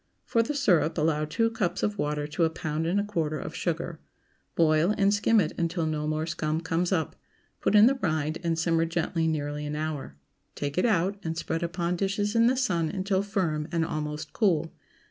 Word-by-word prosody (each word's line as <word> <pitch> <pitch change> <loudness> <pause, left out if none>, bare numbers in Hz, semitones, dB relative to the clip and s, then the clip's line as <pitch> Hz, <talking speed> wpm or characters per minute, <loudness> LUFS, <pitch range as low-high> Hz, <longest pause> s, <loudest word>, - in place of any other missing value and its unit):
For 230 -2 +2
the 260 +6 -2
syrup, 175 - +2
allow 155 -1 +1
two 225 +9 0
cups 190 -5 -1
of 210 -1 -1
water 150 0 -1
to 150 +3 -1
a 165 - +4
pound 160 0 -3
and 185 +4 +2
a - - +1
quarter 165 -7 -2
of 155 - -6
sugar. 170 -1 -3 0.6
Boil, 165 +4 +3
and 200 0 +3
skim 215 +2 +3
it - - 0
until 170 0 0
no 155 -1 -2
more 155 +1 -1
scum 155 -1 -1
comes 170 +2 -1
up; 160 -5 0 0.4
put - - +1
in 210 +1 +9
the 265 +2 +3
rind, 155 -2 -1
and 165 -1 0
simmer 165 0 +2
gently 165 0 -1
nearly 150 -1 -2
an 150 0 -3
hour. 150 - -4 0.4
Take 145 0 -3
it 215 - +3
out, 200 -1 +1
and 160 0 -3
spread 165 0 -2
upon 170 0 -1
dishes 205 +3 -1
in 230 0 +5
the 255 +1 +2
sun 175 -11 +1
until 190 +1 0
firm 175 -7 -1
and 165 -1 +1
almost 150 0 -4
cool. 170 -7 +1
165 Hz, 205 wpm, -27 LUFS, 155-195 Hz, 0.6 s, in